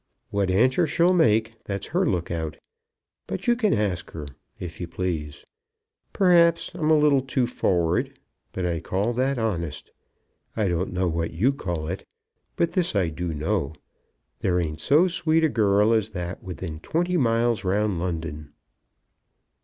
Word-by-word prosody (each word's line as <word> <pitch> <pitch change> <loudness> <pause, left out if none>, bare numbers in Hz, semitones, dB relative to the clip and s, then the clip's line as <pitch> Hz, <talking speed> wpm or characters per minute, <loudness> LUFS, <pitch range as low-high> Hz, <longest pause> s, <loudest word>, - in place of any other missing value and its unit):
What 100 -2 0
answer 125 - +3
she'll 170 +4 +3
make, 115 -8 +2
that's 100 -1 -4
her 180 0 +2
look 85 -3 -2
out. 80 -3 -3 0.7
But - - -5
you 240 - +4
can 220 -4 +1
ask 100 - -1
her, 80 -2 -6 0.3
if 90 -1 -7
you 85 - -3
please. 85 -4 -4 0.7
Perhaps 170 -3 +4
I'm 160 -3 -1
a 155 - +6
little 145 -2 +4
too 130 -1 0
forrard; 90 -8 0 0.3
but 95 - -3
I 85 -2 -1
call 100 +8 -1
that 130 +3 0
honest. 85 -9 -3 0.7
I 105 -3 +2
don't 85 +2 -1
know 90 0 0
what 85 0 -2
you 120 +11 +3
call 85 - -4
it. 95 +4 -4 0.5
But 170 - +1
this 180 - 0
I 95 -4 +2
do 85 +2 -4
know; 80 0 -1 0.6
there 90 -1 +1
ain't 80 -2 -3
so 155 - +4
sweet 165 -2 +1
a 160 - +4
girl 105 -2 +3
as 110 -1 +1
that 90 -3 -5
within 90 -3 -6
twenty 175 - -1
miles 115 - +2
round 100 0 0
London." 80 -4 -4
100 Hz, 160 wpm, -25 LUFS, 85-135 Hz, 0.7 s, a